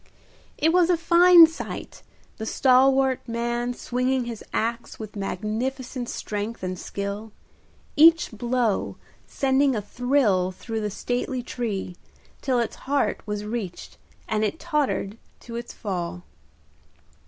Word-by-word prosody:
It 320 +2 +2
was 355 -1 +4
a 350 - +4
fine 340 +1 +8
sight, 320 0 -7 0.4
the 220 - -5
stalwart 265 +1 +4
man 240 +1 -2
swinging 250 +1 -1
his 235 -2 -6
axe 230 +1 -2
with 215 -1 -8
magnificent 235 +6 -3
strength 210 +1 -4
and 185 -1 -3
skill, 200 +2 -5 0.6
each 330 +1 +6
blow 235 -1 -1 0.3
sending 270 0 +2
a - - 0
thrill 220 -6 +1
through 220 +4 -5
the 210 - -1
stately 245 +4 -3
tree, 210 -7 -4 0.5
till 260 -3 +1
its 235 -1 -1
heart 275 -7 +1
was 210 0 -3
reached 210 -5 -6 0.3
and 215 0 0
it 265 +10 -1
tottered 285 - -1 0.2
to 235 - -9
its 235 0 -5
fall. 180 -3 -4
240 Hz, 125 wpm, -25 LUFS, 210-265 Hz, 0.6 s, fine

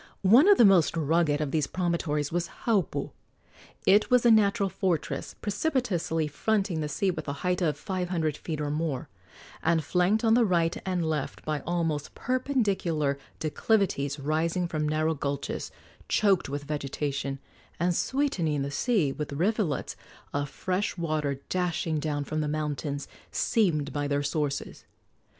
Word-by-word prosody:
One 235 - +7
of 410 - +7
the 235 - +7
most 180 -4 +4
rugged 155 -1 +2
of 145 -3 -2
these 150 -2 +1
promontories 165 -5 -1
was 170 0 -1 0.2
Haupu. 210 -7 0 0.7
It 205 +2 +5
was 250 -1 +4
a 235 - +7
natural 205 -1 +4
fortress, 185 -3 -2
precipitously 205 - 0
fronting 195 +2 0
the 150 - -2
sea 190 +6 +1
with 175 - -6
a 140 - -1
height 180 0 +1
of 155 -4 +1
five 185 -3 -3
hundred 160 -5 0
feet 155 -1 -5
or 145 -1 -2
more, 150 -4 -2 0.5
and 165 -2 +2
flanked 180 - +2
on 225 -1 +4
the 240 +1 +5
right 170 -4 +2
and 180 -3 0
left 155 -3 -3
by 155 -1 -1
almost 165 -4 -1
perpendicular 200 - 0 0.2
declivities 155 -4 0
rising 165 +5 0
from 155 -2 -1
narrow 155 +1 +1
gulches 140 -2 -3 0.4
choked 195 -7 +3
with 145 +1 -4
vegetation 140 -1 -3 0.4
and 175 +1 +1
sweetening 170 - 0
the 140 - -4
sea 190 - +1
with 150 +1 -5
rivulets 175 - 0 0.4
of 145 0 -1
fresh 185 +5 -2
water 155 -5 -1
dashing 175 -3 0
down 145 -1 -2
from 155 +2 -2
the 150 - -1
mountains 145 -1 -3 0.2
seamed 155 - +1
by 145 -1 -1
their 145 0 0
sources. 145 -1 -2
165 Hz, 150 wpm, -28 LUFS, 150-190 Hz, 0.7 s, One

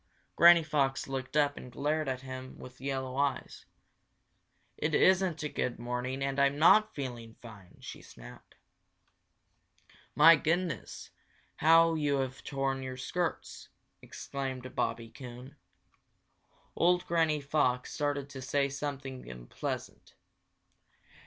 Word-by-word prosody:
Granny 170 -1 +7
Fox 140 -3 0
looked 135 +1 -4
up 145 -1 +2
and 125 - -9
glared 150 +3 -1
at 130 -1 -3
him 130 0 -8
with 130 0 -12
yellow 130 -1 -3
eyes. 140 0 -2 1.1
"It 155 0 -1
isn't 185 -4 +3
a - - -1
good 125 -4 -3
morning 125 +3 -3
and 135 0 -2
I'm 140 0 +3
not 215 +7 +5
feeling 120 -5 -6
fine!" 105 -6 -14
she - - -9
snapped. - - -14 1.6
"My 165 +3 +8
goodness, 165 +2 -2 0.5
how 165 +1 +5
you 145 -3 0
have 135 -1 -3
torn 135 -1 -2
your 130 -1 -6
skirts!" 170 +6 -4 0.3
exclaimed 130 -2 -6
Bobby 115 0 -2
Coon. 125 0 -11 1.2
Old 180 +1 +2
Granny 160 -3 +1
Fox 140 -3 0
started 145 -1 -2
to 135 -2 -8
say 140 +1 0
something 135 - -6
unpleasant. - - -7
140 Hz, 120 wpm, -30 LUFS, 130-150 Hz, 1.6 s, My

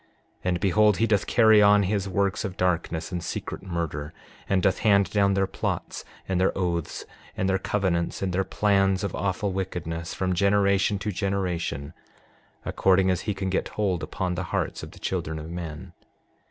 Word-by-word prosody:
And 90 -1 0
behold, 105 +3 +3
he 115 - +3
doth 105 -3 +1
carry 110 -2 +6
on 105 0 +6
his 100 0 -1
works 100 0 0
of 95 -3 -5
darkness 85 -1 -1
and 90 -2 -3
secret - - -5
murder, 80 -4 -4 0.4
and 95 -2 +2
doth 95 - +2
hand 100 -2 +3
down 100 -2 +3
their 95 0 +2
plots, - - -4 0.2
and 95 -1 0
their 95 - +1
oaths, 85 -4 -2 0.3
and 95 - 0
their 95 0 +1
covenants, 95 -3 -1
and 95 -2 -1
their 95 +2 +1
plans 95 -1 +2
of 100 - -2
awful 100 +1 -1
wickedness, 85 -3 -4
from 95 -1 0
generation 100 +1 +2
to 105 +2 -3
generation 90 -7 -2 0.7
according 95 0 +3
as 90 - -1
he 105 - 0
can 95 -1 -2
get 95 - 0
hold 95 -5 -1
upon 90 +4 -3
the 90 - -3
hearts - - -2
of - - -8
the - - -15
children 80 +1 -3
of 80 +1 -7
men. 85 +1 -7
95 Hz, 180 wpm, -26 LUFS, 90-100 Hz, 0.7 s, carry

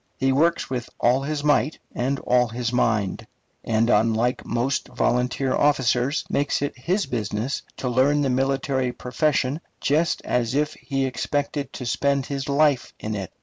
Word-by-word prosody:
He 135 0 +2
works 165 +5 +2
with 125 -3 -4
all 125 +3 +3
his 145 +1 -3
might 150 0 +2 0.2
and 135 +3 -1
all 125 0 +3
his 120 +1 -3
mind; 105 -6 0 0.4
and, 115 0 +1
unlike 115 +2 +2
most 120 +3 -1
volunteer 125 +2 0
officers, 135 0 +2
makes 145 0 0
it 145 - -2
his 180 +10 0
business 115 +1 -2 0.2
to 130 - -3
learn 135 +4 +3
the 140 - +1
military 135 0 0
profession 135 +3 0 0.2
just 155 +4 +1
as 125 0 0
if 150 +1 +1
he 135 -2 -2
expected 140 +1 -2
to 125 - -6
spend 140 +2 +1
his 140 0 -4
life 140 -2 +2
in 110 - -4
it. 95 -3 -4
130 Hz, 155 wpm, -24 LUFS, 120-145 Hz, 0.4 s, all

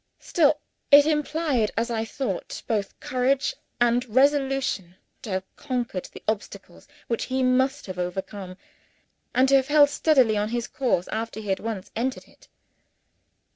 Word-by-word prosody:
Still, 305 -4 +2 0.3
it 285 0 +8
implied, 300 -6 +1
as 235 +1 0
I 225 -1 -1
thought, 225 -6 -4
both 210 -4 -2
courage 265 - 0 0.3
and 240 0 +3
resolution 265 -7 +1 0.3
to - - -8
have 190 0 -4
conquered 245 -9 -3
the - - -12
obstacles 215 -1 -5 0.2
which 230 - -1
he 260 0 -1
must 260 +2 +2
have 185 -2 -7
overcome, 185 +1 -5 0.8
and 260 +2 +5
to 275 - +6
have 265 -1 0
held 290 -1 +6
steadily 265 -9 +3
on 210 +1 0
his 240 0 -2
course 235 -9 0
after 225 0 -4
he 210 -2 -7
had 190 - +1
once 215 -4 -5
entered 255 +3 -2
it. - - -22
240 Hz, 150 wpm, -25 LUFS, 210-270 Hz, 0.8 s, it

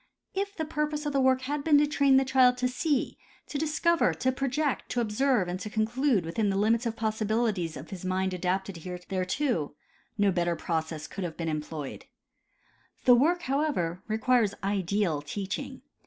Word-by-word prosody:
If 400 +1 -2
the 320 - -1
purpose 300 -1 -2
of 295 - -1
the 275 - +2
work 260 0 +3
had 285 +2 -3
been 300 -1 +5
to 295 - +5
train 280 -2 +4
the 270 - +3
child 255 -1 +4
to 250 0 +1
see, 270 +2 -1 0.3
to 285 - -4
discover, 315 - +2
to 260 +10 +1
project, 275 +2 -1
to 245 - -1
observe 235 -2 +1
and 180 +1 -3
to 210 - -5
conclude 225 - +1
within 200 +6 0
the 195 - 0
limits 225 +4 +2
of 225 - -3
the - - -19
possibilities 215 -5 0
of 135 +5 -10
his 190 -2 -7
mind 185 0 0
adapted 185 +1 -2
thereto, 180 - -2 0.4
no 205 -1 +3
better 175 -1 0
process 160 -1 -3
could 195 - -6
have 165 -3 -5
been 165 -1 -2
employed. 150 -2 -5 1.0
The 250 - +8
work, 335 +8 +3
however, 265 - -1
requires 220 -1 +2
ideal 195 -4 0
teaching. 195 +7 -5
220 Hz, 175 wpm, -28 LUFS, 180-270 Hz, 1.0 s, The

